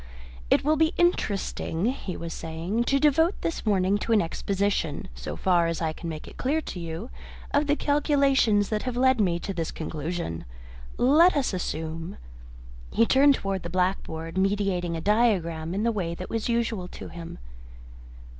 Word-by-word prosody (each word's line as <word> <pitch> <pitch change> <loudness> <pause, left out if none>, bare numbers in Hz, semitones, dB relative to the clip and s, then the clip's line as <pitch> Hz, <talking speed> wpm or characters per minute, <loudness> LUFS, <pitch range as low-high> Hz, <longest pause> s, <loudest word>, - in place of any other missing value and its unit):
"It - - +4
will 305 +1 +3
be 320 +1 +2
interesting," 205 - 0
he 230 -7 -2
was 165 -1 -5
saying, 170 +9 -2
"to 275 +2 +2
devote 320 +6 +3
this 330 -8 -3
morning 195 0 +2
to 230 - -3
an 220 - +5
exposition, 195 -2 -1
so - - -6
far 175 - +2
as 165 -1 -2
I 160 -2 -1
can 170 - -6
make 155 -1 -7
it - - -12
clear 290 +5 +1
to 240 - -6
you, 170 +7 -6 0.4
of 290 +1 +2
the 290 - +3
calculations 280 -8 +2
that 215 -1 -1
have 250 -2 -3
led 260 -2 +4
me 175 -4 +2
to 195 +3 -5
this 165 -3 -2
conclusion. 155 - -4 0.5
Let 305 +7 +5
us 265 -7 0
assume 165 -2 -4 0.3
" - - -17
He 230 - +4
turned 275 +3 +5
towards 195 -4 -3
the 170 - -6
blackboard, 180 -2 -1
meditating 190 -3 0
a - - -5
diagram 180 -6 +1
in 205 - 0
the 235 - +2
way 175 -6 -2
that 185 - -7
was 225 +1 -2
usual 230 -5 0
to - - -9
him. 170 -1 -8
195 Hz, 175 wpm, -26 LUFS, 165-245 Hz, 0.5 s, an